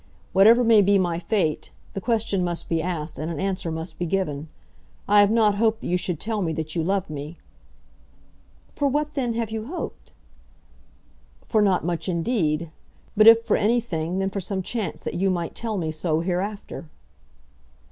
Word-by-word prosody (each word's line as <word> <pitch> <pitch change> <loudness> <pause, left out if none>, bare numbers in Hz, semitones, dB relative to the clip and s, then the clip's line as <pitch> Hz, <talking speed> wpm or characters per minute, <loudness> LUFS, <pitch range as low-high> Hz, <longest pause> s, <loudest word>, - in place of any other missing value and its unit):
Whatever 225 +6 +6
may 225 -3 +6
be 200 +1 +4
my 175 -3 0
fate, 175 -5 -1 0.2
the 195 - -4
question 220 -5 0
must 175 -1 -3
be 165 -1 0
asked, 165 -3 -4
and 155 +2 -3
an 165 -3 -4
answer 190 -2 -2
must 160 +1 -6
be 175 - -1
given. 160 -5 -2 0.6
I 205 +1 +5
have 205 0 +6
not 215 -2 +3
hoped 220 0 +1
that - - -5
you 180 - +2
should 180 -3 -2
tell 220 -1 -2
me 165 -3 -1
that 155 +1 -4
you 165 - +1
loved 195 +3 0
me 150 +3 -7 0.7
" - - -32
"For 285 - +1
what 300 +2 -1
then 245 -5 -1
have 230 -2 -2
you 220 0 -4
hoped?" 355 +5 -7 1.3
"For 220 - +2
not 190 -5 +2
much, 170 -1 -2
indeed; 170 -4 0 0.4
but 215 +1 +6
if 230 0 +8
for - - +2
anything, 200 -7 0
then 195 0 -1
for 195 - -3
some 190 0 -3
chance 210 -5 -4
that - - -4
you 190 +2 +1
might 175 -3 -2
tell 225 -3 -3
me 160 -4 -2
so 155 0 0
hereafter." 185 -1 -4
190 Hz, 185 wpm, -24 LUFS, 165-220 Hz, 1.3 s, if